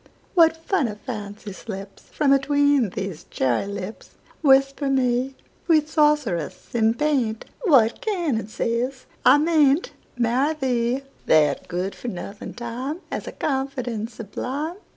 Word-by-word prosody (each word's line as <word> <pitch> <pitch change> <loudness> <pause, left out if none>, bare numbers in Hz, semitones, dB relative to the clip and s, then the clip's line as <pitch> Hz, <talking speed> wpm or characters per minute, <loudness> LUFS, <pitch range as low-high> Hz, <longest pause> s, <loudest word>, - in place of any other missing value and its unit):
What 325 -3 +5
funny 320 - 0
fancy 210 -4 -6
slipsFrom 200 +8 -2
atween 285 -3 +3
these 190 -3 -5
cherry 130 +8 0
lips! 200 +1 -7 0.3
Whisper 275 -1 +4
me, 260 0 +1 0.3
Sweet 310 -3 +4
sorceress 295 - +1
in 225 -1 +3
paint, 255 -7 0 0.2
What 250 - +4
canon 340 - -1
says 240 +4 -2 0.2
I 265 - +7
may 300 -3 +4
n'tMarry 270 -1 -2
thee? 250 0 0 0.2
That 155 -1 +3
good 180 +2 -2
for - - -9
nothing 200 0 -6
TimeHas 250 +8 -5
a - - -4
confidence 255 -5 -3
sublime! 275 - -4
255 Hz, 115 wpm, -23 LUFS, 220-290 Hz, 0.3 s, I